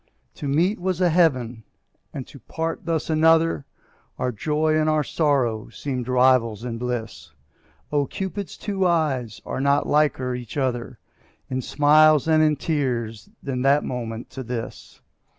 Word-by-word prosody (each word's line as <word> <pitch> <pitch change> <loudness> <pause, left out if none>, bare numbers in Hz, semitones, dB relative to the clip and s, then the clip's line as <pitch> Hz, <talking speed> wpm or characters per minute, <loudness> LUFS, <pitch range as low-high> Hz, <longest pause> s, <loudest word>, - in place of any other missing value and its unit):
To 145 - -6
meet 170 +9 +1
was 185 -1 -1
a 180 -2 +3
heaven 130 -9 +1 0.5
and 135 - -6
to 140 - -14
part 165 +6 -4
thus 165 -2 -1
another, 160 -1 +3 0.5
Our 125 - -1
joy 155 +7 0
and 155 0 +2
our 155 -1 +2
sorrow 130 -8 0
seemed 130 -4 -4
rivals 125 -3 +3
in 115 -2 -4
bliss; 115 -10 -4 0.6
Oh! 145 -2 +1
Cupid's 195 0 -5
two 195 -3 -1
eyes 135 -10 0
are - - -3
not 140 +1 +2
liker 145 -4 +1
each 125 +2 -7
other 125 -2 -2 0.5
In 130 0 -1
smiles 150 +2 +4
and 160 -1 +4
in 155 -1 +3
tears 125 -8 -2
than 130 -2 -3
that 140 +2 +3
moment 115 -2 -5
to 135 - -6
this. 120 -2 -7
140 Hz, 150 wpm, -23 LUFS, 125-155 Hz, 0.6 s, smiles